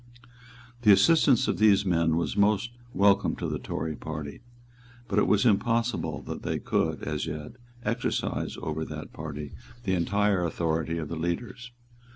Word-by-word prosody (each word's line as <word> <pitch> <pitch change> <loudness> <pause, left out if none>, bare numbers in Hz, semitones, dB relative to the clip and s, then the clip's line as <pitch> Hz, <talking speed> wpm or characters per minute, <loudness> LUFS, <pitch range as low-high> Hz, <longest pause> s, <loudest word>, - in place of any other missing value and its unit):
The 105 -3 +6
assistance 125 +5 +5
of - - -1
these 105 -2 +5
men 85 -3 +2
was 85 -4 -1
most 105 +3 +2 0.2
welcome 100 -1 +3
to - - -4
the - - -3
Tory 80 0 -4
party; 75 +1 -6 0.7
but 105 - +1
it - - +3
was 105 +1 +3
impossible 115 +2 +1
that - - -6
they - - -2
could, - - -1
as 75 +1 -2
yet, 75 -1 -5 0.3
exercise 115 +3 -2
over 80 +1 -2
that 75 -1 -7
party 75 -2 -6 0.3
the 95 -4 0
entire 100 +1 +1
authority 80 0 -1
of 80 -2 -5
leaders. 85 +9 -3
90 Hz, 150 wpm, -27 LUFS, 80-105 Hz, 0.7 s, The